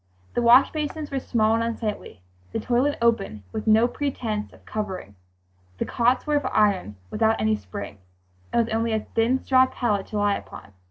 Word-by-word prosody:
The - - 0
wash 240 +3 +6
basins 305 -1 -4
were 275 - -1
small 220 -3 +1
and 230 0 +1
unsightly; 215 - -4 0.3
the - - -1
toilet 255 +4 +1
open, 195 - +1
with 215 - -5
no 220 +2 +5
pretense 235 -6 -3
of - - -20
covering. 190 - -5 0.6
The - - -1
cots 245 +2 +1
were 300 -1 +2
of 285 - -2
iron, 195 - +2 0.2
without 220 0 +2
any 215 0 +2
spring, 100 - -8 0.5
and 235 - +2
with 225 - -5
only 225 0 0
a 220 - 0
thin 230 +3 +2
straw 260 -1 +5
pallet 210 -7 -1
to 215 - -4
lie 205 -1 +2
upon. 100 - -12
225 Hz, 180 wpm, -24 LUFS, 210-245 Hz, 0.6 s, wash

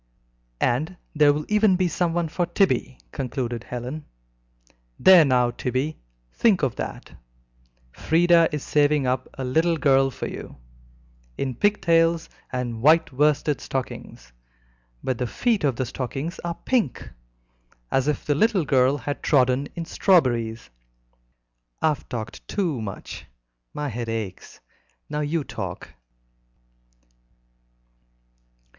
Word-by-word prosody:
"And 150 +9 0 0.2
there 150 -2 +5
will 150 +1 -2
even 210 -2 +4
be 180 0 +1
someone 170 0 0
for 175 +2 -2
Tibby," 170 - +1
concluded 120 -3 -3
Helen. 125 +5 -6 0.9
"There 185 -3 +8
now, 125 -3 +2
Tibby, 130 +6 -2 0.3
think 205 -8 +3
of 130 -3 +1
that; - - -6 0.8
Frieda 170 - +3
is 150 -2 -3
saving 145 -1 +2
up 130 0 -1
a 135 - -5
little 160 +6 +1
girl 135 -3 +3
for - - -6
you, - - -7 0.8
in 130 -2 -2
pig 205 - +1
tails 165 -1 +3 0.2
and 120 -3 -3
white 155 +2 +4
worsted 150 +1 +1
stockings, 65 - -6 0.7
but 130 -3 -2
the 125 - -1
feet 230 - 0
of 135 -4 +2
the 130 - -2
stockings 135 +7 -5
are 170 -1 -4
pink, 230 - -1 0.8
as 135 +1 +1
if 150 - -1
the 145 - +2
little 195 +2 +2
girl 135 0 +3
had 145 +2 -5
trodden 130 0 +2
in 170 -1 -4
strawberries. 120 - +1 1.1
I've 150 -4 0
talked 115 -4 -6
too 170 - -1
much. 100 -3 -7 0.4
My 150 -1 -4
head 120 -1 -4
aches. 110 -5 -6 0.5
Now 150 - -2
you 150 +1 -1
talk." - - -6
145 Hz, 125 wpm, -24 LUFS, 125-165 Hz, 1.1 s, There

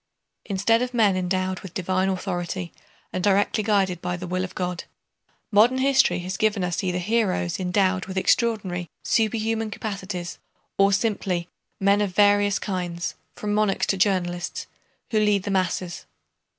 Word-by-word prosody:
Instead 215 +3 +2
of 250 0 -3
men 210 -5 +4
endowed 185 0 -1
with 190 - -11
divine 185 +1 0
authority 180 -1 -3 0.4
and 185 - -2
directly 205 +2 +2
guided 195 -4 +1
by 180 0 -2
the 180 - -6
will 185 +1 -2
of 185 - -6
God, 180 -1 -3 0.7
modern 225 +5 +5
history 270 +1 +3
has 185 +2 -4
given 215 -3 +1
us 175 0 -1
either 180 -1 0
heroes 185 -3 0
endowed 185 0 +1
with 190 0 -6
extraordinary, 190 -5 +1
superhuman 225 0 0
capacities, 195 -4 -5 0.4
or 195 0 +5
simply 190 -4 0 0.3
men 200 +1 +3
of 195 -3 -2
very 205 0 +6
various 205 -1 +1
kinds, 180 -3 -3 0.2
from 210 -1 -3
monarchs 210 -2 +2
to - - +1
journalists, 180 -3 0 0.5
who 220 - +3
lead 210 -2 +2
the 200 - -3
masses. 185 -2 -1
190 Hz, 150 wpm, -24 LUFS, 180-210 Hz, 0.7 s, very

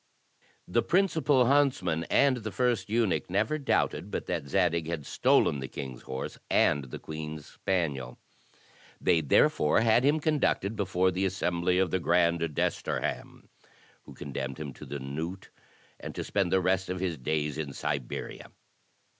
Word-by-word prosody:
The 120 +6 +2
principal 160 -8 +3
himtsman 120 - +2
and 140 -2 +4
the 110 -2 -5
first 120 -6 0
eunuch 110 -5 +1
never 155 +12 0
doubted 140 - 0
but - - -4
that 70 - -3
Zadig 85 -1 +1
had 80 -4 -4
stolen 70 - +2
the 65 - -5
king's 65 -3 -7
horse 65 0 -6
and 70 -2 +3
the 65 - -7
queen's 75 -1 -7
spaniel. 70 -10 -2 0.8
They 85 -3 +3
therefore 75 +4 +3
had 115 +2 +4
him 145 +3 +3
conducted 145 -9 0
before 95 -2 +1
the 95 +2 -1
assembly 90 -1 0
of 95 -3 +2
the 95 - +1
grand 85 0 +2
desterham 80 -3 -2 0.6
who - - -12
condemned 65 -2 -5
him 70 -3 -5
to - - -11
the 70 +2 -4
knout, 80 +8 -5 0.5
and - - -7
to - - -3
spend 95 -4 0
the 95 - +3
rest 95 +1 +1
of 90 0 -3
his 90 -5 -2
days 75 +2 -1
in 75 -3 -3
Siberia. 65 -2 -4
90 Hz, 155 wpm, -29 LUFS, 75-105 Hz, 0.8 s, and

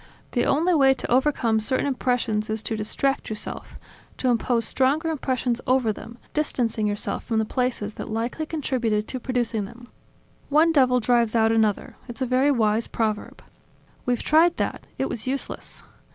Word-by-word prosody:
The 240 - +1
only 330 +6 +3
way 270 -4 +5
to - - -5
overcome 250 -4 +2
certain 260 +6 0
impressions 245 -5 0
is 220 0 -2
to 225 - -1
distract 270 +6 -1
yourself, 215 -1 -6 0.4
to 255 - 0
impose 235 -1 +1
stronger 285 +8 +1
impressions 255 -5 -1
over 255 -4 +3
them, 230 +3 -11 0.2
distancing 235 -8 0
yourself 205 0 -2
from 225 - -1
the 220 - +2
places 235 -3 -2
that - - -6
likely 235 +8 -2
contributed 240 -9 -1
to 255 - -4
producing 240 -4 -1
them. 240 +4 -13 0.6
One 310 +3 +5
devil 255 -4 +4
drives 235 -1 +2
out 225 -1 +4
another: 220 -2 +1
it's 240 0 -8
a - - +1
very 255 +3 +3
wise 225 -4 +2
proverb." 215 -2 -3 0.6
"We've 245 -1 0
tried 330 +3 +4
that; - - -3
it 270 - 0
was 235 +1 -6
useless. 270 +1 -3
245 Hz, 165 wpm, -24 LUFS, 220-265 Hz, 0.6 s, way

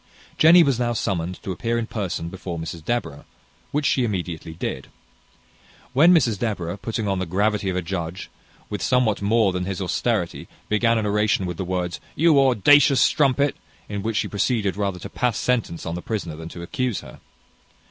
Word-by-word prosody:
Jenny 170 +2 +8
was 135 -5 +1
now 120 -1 0
summoned 90 -5 -2
to 95 - -4
appear 115 +5 -1
in 115 - -1
person 95 -7 -4
before 90 -1 -6
Mrs 80 0 -6
Deborah, 100 -8 -3 0.5
which 145 0 0
she 130 - +2
immediately 85 -7 -4
did. 85 - -4 1.1
When 155 +7 +6
Mrs 120 - +3
Deborah, 100 -7 -2
putting 110 -1 -3
on 95 -1 0
the 95 - -3
gravity 100 +2 0
of 90 - -2
a 90 - -1
judge, 85 0 -5 0.4
with 105 - -5
somewhat 125 -5 +2
more 105 0 +3
than 90 0 -2
his 95 0 -4
austerity, 90 -3 -1 0.2
began 115 +2 +2
an 110 - -1
oration 105 -2 +1
with 90 -2 -4
the - - -2
words, 90 -1 -2 0.2
"You 155 -2 +5
audacious 135 +3 +5
strumpet!" 140 -1 +3 0.3
in 100 -1 -4
which 110 +1 -2
she - - 0
proceeded 100 -1 0
rather 100 -2 -2
to - - -7
pass 125 -2 -1
sentence 115 -9 -1
on 85 - -3
the 90 - -4
prisoner 90 -8 -4
than 80 +1 -8
to 85 - -8
accuse 125 +4 -2
her. - - -13
105 Hz, 185 wpm, -23 LUFS, 90-120 Hz, 1.1 s, Jenny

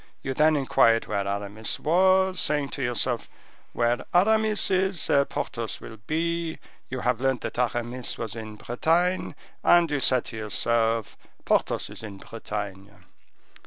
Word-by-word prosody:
You 135 - -2
then 155 +3 +4
inquired 130 -5 +3
where 100 -2 -2
Aramis 100 +2 -3
was, 185 +3 +3
saying 145 -2 0
to 140 - -5
yourself, 120 -1 0 0.4
'Where 120 0 0
Aramis 215 +2 +3
is, 190 -2 +1
there 140 0 +3
Porthos 115 -5 -4
will 110 - -10
be.' 165 +1 -1 0.3
You 130 0 -4
have 125 0 0
learnt 130 -3 +1
that - - -5
Aramis 120 0 -2
was 110 -1 -5
in 110 -1 -7
Bretagne, 165 +11 0 0.3
and 175 -2 +5
you 145 - +1
said 130 -2 +2
to 110 - -6
yourself, 115 +1 0 0.3
'Porthos - - 0
is - - -10
in 105 -3 -8
Bretagne. 100 -2 -6
125 Hz, 145 wpm, -26 LUFS, 115-165 Hz, 0.4 s, and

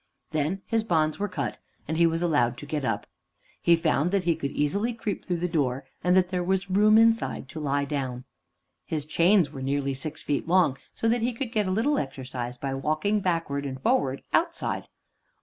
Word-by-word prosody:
Then 160 +5 -1
his 225 -1 0
bonds 155 -6 +1
were 205 - 0
cut, 185 - -4 0.3
and 160 - -2
he 170 +1 +5
was 165 +1 0
allowed 125 -8 +2
to 145 - -8
get 150 0 -3
up. - - -1 0.6
He 170 - +5
found 165 -1 +1
that 195 0 +1
he 170 -1 +2
could 140 -3 -3
easily 200 +13 0
creep 220 -4 -4
through 175 - -1
the 175 +1 -1
door, 140 -6 -1 0.2
and 180 0 +4
that 180 -1 +3
there 180 -1 0
was 190 +1 -1
room 210 +3 +5
inside 225 -10 +3
to 160 - -7
lie 140 -1 0
down. 130 -4 -3 0.6
His 155 -3 -3
chains 170 0 +3
were 135 -3 -7
nearly 140 +1 0
six 135 +3 -6
feet 145 +1 -1
long, 170 -6 +3 0.2
so 225 - -1
that 235 +1 +2
he 240 +2 0
could 230 0 -4
get 210 -3 +1
a - - 0
little 235 +10 +2
exercise 125 -3 -5
by 135 +1 -3
walking 155 +10 0
backwards 165 -7 -1
and 130 -1 -6
forwards 135 0 +1
outside. 335 0 0
165 Hz, 200 wpm, -27 LUFS, 140-195 Hz, 0.6 s, he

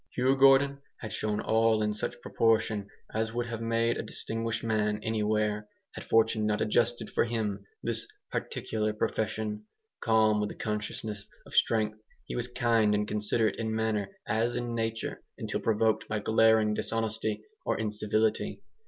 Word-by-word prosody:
Hugh 130 +2 +3
Gordon 135 +1 +5 0.2
had 110 -2 -7
shown 105 -1 -1
all 110 -1 +3
in 105 0 +1
such 105 - -3
proportion 110 -4 +1 0.2
as 110 +1 -1
would 120 0 0
have 115 -1 -5
made 115 +1 +1
a - - -1
distinguished 115 +1 -3
man 105 -2 +1
anywhere, 105 -1 0 0.2
had - - -8
fortune 110 -1 +3
not 105 0 +1
adjusted 120 +2 +1
for - - +2
him 110 -4 -2 0.2
this - - -2 0.2
particular 110 -1 -2
profession. 105 0 -2 0.3
Calm 110 -2 +3
with 105 0 0
the - - -8
consciousness 105 -1 -4 0.2
of - - -14
strength, 110 -1 +2 0.3
he - - -5
was 120 0 0
kind 115 -4 +2
and 105 0 0
considerate 105 +1 0
in 110 -1 -2
manner 110 -3 0 0.2
as 115 +3 0
in 120 -1 -2
nature, 115 -1 -2 0.2
until - - -3
provoked 110 0 +1
by 110 - -1
glaring 110 0 +4
dishonesty 110 -1 -1 0.2
or - - 0
incivility. 110 0 0
110 Hz, 155 wpm, -29 LUFS, 105-115 Hz, 0.3 s, Gordon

